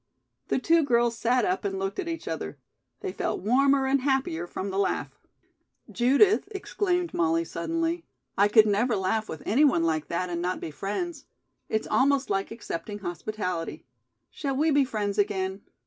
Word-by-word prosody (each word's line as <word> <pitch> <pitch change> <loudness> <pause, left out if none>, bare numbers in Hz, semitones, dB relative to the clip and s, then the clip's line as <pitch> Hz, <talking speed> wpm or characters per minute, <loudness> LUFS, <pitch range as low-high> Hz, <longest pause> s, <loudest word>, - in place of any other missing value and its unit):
The - - +1
two 330 +5 +4
girls 235 -3 +2
sat 240 0 +2
up 185 - 0
and 195 -1 -2
looked 195 +1 -3
at 370 - -3
each 330 -1 -5
other. 160 -2 -4 0.4
They - - -3
felt - - -2
warmer 270 +5 +3
and 270 0 +2
happier 265 - 0
from 190 +2 -4
the 190 - -1
laugh. 200 - -1 0.7
"Judith," 280 - +4
exclaimed 380 -4 -1
Molly, 165 0 +1
suddenly, 330 - -2 0.3
"I 200 +1 +5
could 215 +1 +6
never 215 +3 +2
laugh 215 +3 -1
with 160 - -7
any 250 +9 +3
one 265 - +4
like 160 -2 0
that 175 +1 -2
and 170 0 -2
not 180 +1 -1
be 160 - -6
friends. 275 - -4 0.4
It's 220 - 0
almost 270 -2 +2
like 195 0 0
accepting 205 -3 -6
hospitality. 180 -2 -4 0.5
Shall 275 -2 -3
we 310 +4 +2
be 285 -1 +4
friends 210 -4 -2
again?" 195 -1 0
215 Hz, 170 wpm, -27 LUFS, 190-275 Hz, 0.7 s, could